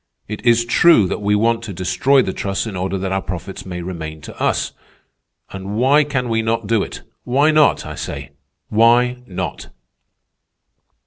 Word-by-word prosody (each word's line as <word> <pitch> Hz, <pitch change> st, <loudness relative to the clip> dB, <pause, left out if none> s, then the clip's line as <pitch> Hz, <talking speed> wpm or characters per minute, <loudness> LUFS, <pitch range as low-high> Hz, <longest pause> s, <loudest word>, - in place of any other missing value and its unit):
It 105 Hz, 0 st, -6 dB
is 120 Hz, 0 st, +4 dB
true 120 Hz, -, +5 dB
that 90 Hz, -, -3 dB
we 105 Hz, 0 st, +2 dB
want 115 Hz, +2 st, +2 dB
to 100 Hz, -, -6 dB
destroy 95 Hz, +10 st, +2 dB
the 95 Hz, -, -3 dB
trusts 100 Hz, +2 st, -2 dB
in 110 Hz, -4 st, -6 dB
order 95 Hz, +1 st, -2 dB
that 95 Hz, 0 st, -3 dB
our 95 Hz, 0 st, 0 dB
profits 95 Hz, +1 st, -7 dB
may 90 Hz, -1 st, -5 dB
remain 80 Hz, -3 st, -6 dB
to -, -, -11 dB
us. -, -, 0 dB, 0.8 s
And 95 Hz, +1 st, -6 dB
why 135 Hz, +6 st, +4 dB
can 135 Hz, -4 st, -2 dB
we 115 Hz, -1 st, +1 dB
not 115 Hz, 0 st, -1 dB
do 110 Hz, 0 st, +1 dB
it? -, -, -6 dB, 0.2 s
Why 140 Hz, +5 st, +3 dB
not? 155 Hz, -1 st, +3 dB
I -, -, -6 dB
say, -, -, -6 dB, 0.4 s
why 120 Hz, +3 st, +4 dB
not?" 90 Hz, -1 st, -5 dB
110 Hz, 175 wpm, -19 LUFS, 95-125 Hz, 0.8 s, true